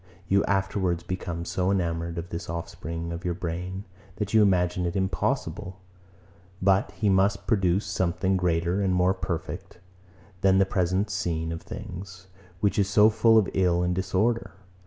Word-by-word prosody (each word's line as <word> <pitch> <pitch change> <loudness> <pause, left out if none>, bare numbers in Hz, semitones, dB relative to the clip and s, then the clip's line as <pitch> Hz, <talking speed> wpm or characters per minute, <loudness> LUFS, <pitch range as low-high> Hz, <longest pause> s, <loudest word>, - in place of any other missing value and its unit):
You 100 +2 +3
afterwards 95 -3 0
become 85 -2 -4
so 90 +1 -1
enamoured 85 -3 -1
of 85 +1 -5
this 85 - -6
offspring 85 0 -5
of 85 +1 -6
your 90 -2 -1
brain, 90 +2 -4 0.3
that 105 0 -4
you 110 - +6
imagine 90 -2 +2
it 85 - -4
impossible, 95 0 -2 0.8
but 95 +1 +2
he 105 - -1
must 100 +1 +2
produce 95 -3 +2
something 95 +1 0
greater 90 +1 +1
and 95 -2 +1
more 90 +1 +3
perfect 85 -3 -5 0.6
than 95 -1 +4
the 95 - +5
present 95 +1 0
scene 85 -4 -2
of 85 - -5
things, 95 +1 -8 0.4
which 100 0 +2
is 100 -1 +2
so 105 +2 +6
full 115 +1 +5
of 105 -4 +4
ill 90 -2 +2
and 90 0 +1
disorder. 95 +6 0
95 Hz, 155 wpm, -26 LUFS, 85-95 Hz, 0.8 s, you